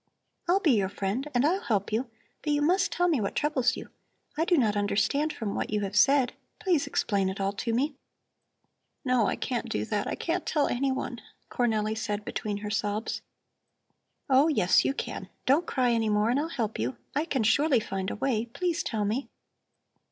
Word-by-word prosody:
I'll 365 +3 +4
be 330 -7 +3
your 200 -5 +2
friend 205 +8 -2
and 245 +3 +4
I'll 365 +6 +2
help 210 -7 -1
you, 235 +3 0 0.3
but 300 - -1
you 290 0 +1
must 370 +5 +2
tell 355 +1 +2
me 305 -9 +2
what 200 - -2
troubles 260 -4 +1
you. - - -8 0.5
I 320 - +1
do 350 -1 +3
not 220 -6 +2
understand 215 +9 +1
from 215 -7 -4
what - - -2
you 210 0 0
have 200 0 -3
said. 270 +3 +4 0.3
Please 365 -8 +1
explain 195 -3 +1
it 190 - -5
all 195 0 +1
to 230 +3 -2
me." 275 +6 +1 1.1
"No, 250 -5 +3
I - - 0
can't 245 -2 -3
do 105 0 -1
that, 205 - -1
I - - -2
can't 345 +2 -2
tell 295 -3 +1
anyone," 260 -2 -1 0.3
Cornelli 220 -3 +1
said 210 -2 -3
between 210 -1 -3
her 210 - -3
sobs. 210 0 -2 1.1
"Oh, 270 +2 +5
yes, 185 - +4
you 275 - 0
can. - - -5 0.2
Don't 290 +6 +3
cry 250 -2 +2
any 225 -2 +1
more 210 +2 +2
and 260 - +2
I'll 310 - -1
help 225 -9 -3
you. 120 +4 -2 0.2
I 300 +3 +1
can 270 -8 0
surely 275 +4 +4
find 195 -2 -3
a - - -4
way. 235 -1 0
Please 340 +7 -1
tell 215 -3 -1
me." 230 +7 -2
240 Hz, 195 wpm, -28 LUFS, 210-290 Hz, 1.1 s, Oh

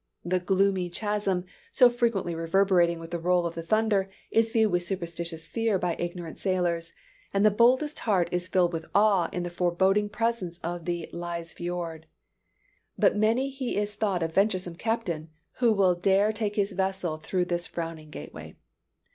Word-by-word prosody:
The 180 +1 +1
gloomy 190 0 +1
chasm, 200 -1 -1 0.3
so 250 - +7
frequently 235 -7 0
reverberating 170 +1 +2
with 165 0 -9
the 170 - -2
roll 175 +1 +2
of 170 - -2
the 165 - -5
thunder, 205 +2 +1 0.2
is 225 0 +3
viewed 220 -3 +3
with 175 0 +2
superstitious 170 -2 -4
fear 225 -3 0
by 175 -2 -1
ignorant 175 -1 -5
sailors; 175 -3 0 0.4
and 200 +1 +2
the 215 - +6
boldest 255 +8 +3
heart 190 -6 +1
is 180 0 -1
filled 180 -2 +2
with 160 -1 -4
awe 200 -4 +4
in 180 - -3
the 175 - -4
forbidding 190 +4 +2
presence 210 -6 -2
of 170 0 -4
the 175 -1 -2
Lyse 170 -1 -5
Fiord. 175 -2 -5 0.9
By - - +5
many 230 +6 +1
he 265 -4 -3
is 205 0 -1
thought 200 -4 0
a - - +1
venturesome 185 0 +1
captain 180 -8 -2 0.3
who 240 -3 +4
will 195 -4 +4
dare 195 +4 +2
take 210 -1 -2
his 205 0 +1
vessel 190 -4 -1
through 180 +3 -1
this 175 0 -2
frowning 165 -2 -6
gateway. - - -9
185 Hz, 170 wpm, -27 LUFS, 170-210 Hz, 0.9 s, so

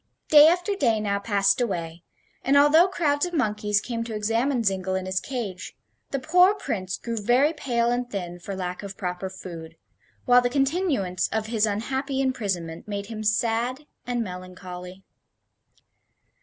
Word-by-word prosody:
Day 300 0 +9
after 355 +5 +2
day 230 - +2
now 200 -1 -1
passed 205 +4 +2
away, 170 -7 -3 0.4
and, 275 +1 +4
although 300 +5 +6
crowds 300 -3 0
of 350 - -6
monkeys 210 -6 +1
came 230 0 -4
to 225 -2 -5
examine 230 +4 0
Zingle 190 -2 0
in 190 0 -2
his 185 0 -1
cage, 215 -9 -5 0.3
the 275 - -1
poor 360 +8 +4
Prince 195 - -3
grew 230 -1 -5
very 245 +8 +3
pale 240 -6 0
and 245 0 -1
thin 175 -4 -5
for 195 +2 -6
lack 180 -1 -4
of 200 -1 -8
proper 180 -1 -4
food, 165 -3 -9 0.5
while 245 0 +6
the 245 - 0
continuance 270 - 0
of 220 0 -2
his 220 -1 +1
unhappy 265 +6 -2
imprisonment 195 -12 -2
made 200 -1 -4
him 215 0 -5
sad 230 +6 0 0.2
and 245 -1 -1
melancholy. 180 0 -9
220 Hz, 155 wpm, -25 LUFS, 190-265 Hz, 0.5 s, Day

